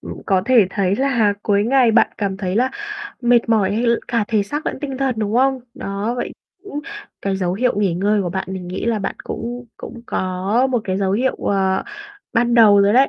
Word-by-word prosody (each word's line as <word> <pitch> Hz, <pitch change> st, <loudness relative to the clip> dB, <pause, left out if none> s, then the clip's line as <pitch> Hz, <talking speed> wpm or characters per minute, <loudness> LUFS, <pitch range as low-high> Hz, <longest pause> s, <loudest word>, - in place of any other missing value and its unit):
ừm, -, -, -8 dB
có 190 Hz, -2 st, +2 dB
thể 240 Hz, -5 st, +5 dB
thấy 195 Hz, 0 st, 0 dB
là 245 Hz, -6 st, +2 dB
cuối 205 Hz, -1 st, +2 dB
ngày 250 Hz, 0 st, +4 dB
bạn 225 Hz, +1 st, +4 dB
cảm 195 Hz, -2 st, -1 dB
thấy 190 Hz, 0 st, -2 dB
là 255 Hz, +2 st, +2 dB, 0.5 s
mệt 240 Hz, -2 st, +3 dB
mỏi, 205 Hz, -4 st, +2 dB
hay 235 Hz, +3 st, 0 dB
l 235 Hz, -, +4 dB, 0.2 s
cả 230 Hz, -3 st, +1 dB
thể 215 Hz, -3 st, +2 dB
xác 295 Hz, +10 st, -5 dB
lẫn -, -, -2 dB
tinh 270 Hz, -3 st, -4 dB
thần, 270 Hz, -3 st, 0 dB
đúng 210 Hz, -1 st, -1 dB
hông? 265 Hz, +2 st, +2 dB
Đó, 200 Hz, +4 st, -3 dB
vậy -, -, -3 dB, 0.3 s
cũng 295 Hz, -8 st, -5 dB, 0.4 s
cái 195 Hz, -1 st, -1 dB
dấu 180 Hz, -2 st, -1 dB
hiệu 250 Hz, +5 st, +1 dB
nghỉ 195 Hz, -4 st, +1 dB
ngơi 200 Hz, +3 st, +1 dB
của 175 Hz, -, -3 dB
bạn 190 Hz, +1 st, -3 dB
mình 185 Hz, -2 st, -6 dB
nghĩ 180 Hz, -, -4 dB
là 230 Hz, -2 st, +1 dB
bạn 195 Hz, -1 st, -3 dB
cũng 245 Hz, +2 st, -5 dB
cũng 235 Hz, -1 st, -9 dB
có 190 Hz, +7 st, 0 dB
một 245 Hz, -2 st, +1 dB
cái 185 Hz, -3 st, -1 dB
dấu 195 Hz, -1 st, 0 dB
hiệu, 250 Hz, +6 st, +1 dB
ờ, 190 Hz, -1 st, 0 dB, 0.5 s
ban 240 Hz, 0 st, +2 dB
đầu 210 Hz, -4 st, +7 dB
rồi 200 Hz, +1 st, +4 dB
đấy. 265 Hz, +4 st, +5 dB
215 Hz, 225 wpm, -20 LUFS, 195-245 Hz, 0.5 s, đầu